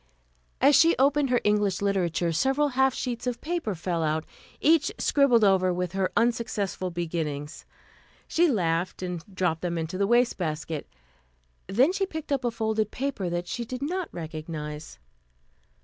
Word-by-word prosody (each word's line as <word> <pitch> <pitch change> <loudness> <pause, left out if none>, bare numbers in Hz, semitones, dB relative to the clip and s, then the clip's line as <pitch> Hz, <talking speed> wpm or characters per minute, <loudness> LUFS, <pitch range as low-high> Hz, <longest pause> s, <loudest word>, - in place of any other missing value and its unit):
As 280 +2 +6
she 330 +5 +6
opened 280 +1 +3
her 245 -1 +3
English 210 -2 +2
Literature, 180 -4 0
several 270 - +2
half 265 0 +3
sheets 245 -1 -3
of 245 -1 -2
paper 325 - -2
fell 175 0 -2
out, 155 0 0 0.3
each 315 -1 +3
scribbled 265 -6 +3
over 190 -2 +4
with 180 -1 -2
her 190 0 -1
unsuccessful 225 -5 0
beginnings.... 160 -4 -4 0.6
She 345 +2 +3
laughed 175 - 0
and 180 -2 -4
dropped 180 -4 -1
them 175 -1 -2
into 165 +3 -3
the 200 - +2
wastebasket. 165 - 0 0.8
Then 260 - +3
she 390 0 0
picked 315 -4 -7
up 275 -2 +1
a 240 - +1
folded 220 -2 -1
paper 250 -9 -3
that 175 +1 -3
she 240 - -3
did 255 +3 -6
not 360 +4 -2
recognize. 155 -2 -6
200 Hz, 150 wpm, -26 LUFS, 170-265 Hz, 0.8 s, As